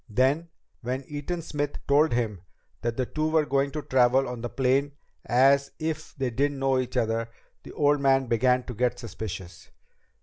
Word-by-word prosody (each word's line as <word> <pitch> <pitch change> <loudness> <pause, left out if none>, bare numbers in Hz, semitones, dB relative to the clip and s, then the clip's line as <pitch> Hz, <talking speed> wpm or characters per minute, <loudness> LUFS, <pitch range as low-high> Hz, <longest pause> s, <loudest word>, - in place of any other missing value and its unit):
Then, 135 +9 +1 0.3
when 130 +3 -3
Eaton 155 +4 -4
Smith 145 -2 -3
told 150 +3 +4
him 110 -6 -1 0.4
that 115 0 -2
the 130 - 0
two 155 +4 -1
were 155 -1 +3
going 140 0 +1
to 150 +1 -5
travel 130 +1 +3
on 125 -1 -5
the 120 - -4
plane 135 +3 +1 0.3
as 135 +3 +4
if 155 0 -4
they 130 -3 -2
didn't 140 +4 0
know 135 -1 +2
each 125 0 -3
other, 115 -1 0 0.3
the - - -11
old 145 0 +3
man 135 -1 +3
began 125 +2 +2
to 125 - -7
get 125 +2 0
suspicious. 95 -7 -7
130 Hz, 175 wpm, -26 LUFS, 120-145 Hz, 0.4 s, told